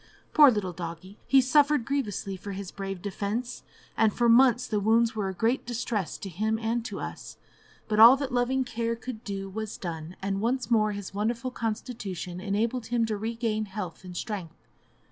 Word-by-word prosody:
Poor 295 -3 +9
little 205 -6 -1
doggie! 170 +4 -8
he 270 +2 +6
suffered 285 0 +3
grievously 215 -8 -2
for 200 +2 -7
his 195 -1 -6
brave 195 -2 -6
defence, 210 +5 -3 0.3
and 220 -1 +4
for 240 +3 +1
months 250 +1 +5
the 215 -4 -1
wounds 225 +2 +3
were 205 -3 -1
a - - -4
great 230 +7 +1
distress 230 - -3
to - - -7
him 215 +5 -1
and 225 +1 -1
to 230 - -5
us; - - -7 0.5
but 215 -1 0
all 235 +4 +10
that 275 -1 -3
loving 255 +2 +1
care 230 -1 -2
could 230 -1 -8
do 195 -1 -4
was 215 +2 -5
done, 165 -1 -6
and 195 0 -2
once 245 +2 -1
more 215 -2 +3
his 200 -2 -7
wonderful 235 +5 -1
constitution 210 -6 -4
enabled 220 +5 -1
him 235 -1 +1
to 220 -1 -2
regain 220 0 -2
health 190 -3 -6
and 180 -1 -8
strength. 195 -7 -6
220 Hz, 185 wpm, -27 LUFS, 195-240 Hz, 0.5 s, all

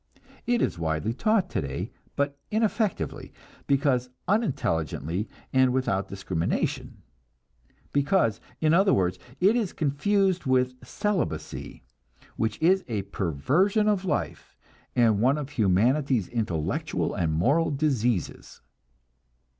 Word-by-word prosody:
It 240 -1 +2
is - - -1
widely 80 +7 -1
taught 215 - +2
today, 70 - -3 0.2
but 140 0 0
ineffectively, 220 -2 -1 0.4
because 135 -3 +2 0.2
unintelligently 100 - -1 0.2
and 130 -1 +4
without 125 -7 0
discrimination; 95 -4 -3 0.9
because, 140 - +2 0.2
in 155 0 +3
other 195 +3 +5
words, 90 -1 0 0.2
it 200 +5 +4
is 225 -7 -1
confused 185 +4 +1
with 130 -1 +2
celibacy, 205 -5 -3 0.5
which 110 0 -1
is 190 +3 +4
a 105 -5 -2
perversion 135 - +1
of 205 -3 +2
life, 165 -6 -3 0.4
and 115 -4 +3
one 130 +5 +3
of 145 -1 -5
humanity's 120 - +2
intellectual 100 -10 -2
and 80 -2 0
moral 140 - +2
diseases. 130 - -1
135 Hz, 105 wpm, -26 LUFS, -, 0.9 s, other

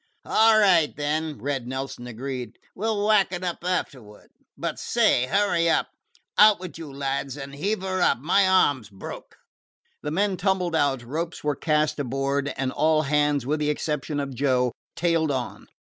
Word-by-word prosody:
"All 220 0 +5
right 180 -7 +4
then," 150 +1 -2
Red 135 0 -3
Nelson 130 -1 -5
agreed. 125 +1 -6 0.2
"We 215 +4 -3
'll 210 -2 0
whack 210 -4 +4
up 175 -1 -4
afterwards. 130 - -4 0.2
But, - - -4
say, 125 - +2
hurry 180 -2 +2
up. - - +1 0.5
Out 210 -2 +7
with 180 -3 -8
you, 155 -4 -8
lads, 135 0 -3
and 140 -1 -8
heave 190 +7 -2
her 185 -1 -1
up! - - +3
My 175 +9 +3
arm 145 -9 +3
's 105 - -15
broke." 95 -2 -10 0.6
The 150 - -4
men 190 +4 0
tumbled 180 -2 0
out, 140 -5 +1
ropes 165 +7 -4
were 150 -1 0
cast 150 +1 0
inboard, 140 +1 -1
and 130 -1 -1
all 155 +2 +2
hands, 145 -2 +1
with 150 +3 0
the 150 0 0
exception 150 0 -2
of 140 -1 -4
Joe, 125 -1 +1 0.2
tailed 165 -2 +1
on. 130 -3 -4
150 Hz, 170 wpm, -25 LUFS, 135-175 Hz, 0.6 s, Out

